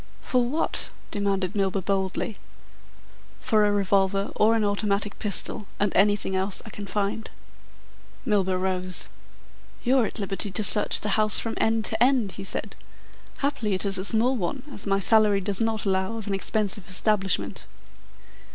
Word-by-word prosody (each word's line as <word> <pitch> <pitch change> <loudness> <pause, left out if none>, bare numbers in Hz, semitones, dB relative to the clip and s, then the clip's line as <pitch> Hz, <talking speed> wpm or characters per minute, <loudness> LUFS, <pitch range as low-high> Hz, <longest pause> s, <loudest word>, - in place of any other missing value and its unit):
"For 250 -1 0
what?" 285 +7 0 0.2
demanded 195 -2 -1
Milburgh 195 -2 -1
boldly. 195 +1 -2 1.0
"For 215 -4 +2
a - - +1
revolver 195 0 +1
or 220 +2 +4
an 225 - +1
automatic 205 0 -1
pistol 210 0 -2
and 205 -1 0
anything 200 -1 +2
else 190 +1 -1
I 220 - -9
can 205 0 -8
find." 205 +2 -2 1.0
Milburgh 190 -5 +1
rose. 185 -1 -1 0.7
"You're 250 -2 +3
at - - -7
liberty 200 0 -1
to 215 +3 -1
search 205 +1 +4
the 210 - -2
house 215 -1 +6
from 225 - -1
end 220 -1 +2
to 220 0 0
end," 245 -5 +3
he 195 - -8
said. 195 - -4 0.7
"Happily, 220 -8 -1
it 185 - -2
is 195 -1 +2
a - - -2
small 230 +6 +3
one, 245 +5 -3
as 200 - -8
my 195 0 +2
salary 210 0 +4
does 195 +2 -3
not 225 -1 -1
allow 190 +3 0
of 220 - -6
an 200 - -3
expensive 195 0 -2
establishment." 195 +1 0
205 Hz, 160 wpm, -25 LUFS, 195-220 Hz, 1.0 s, house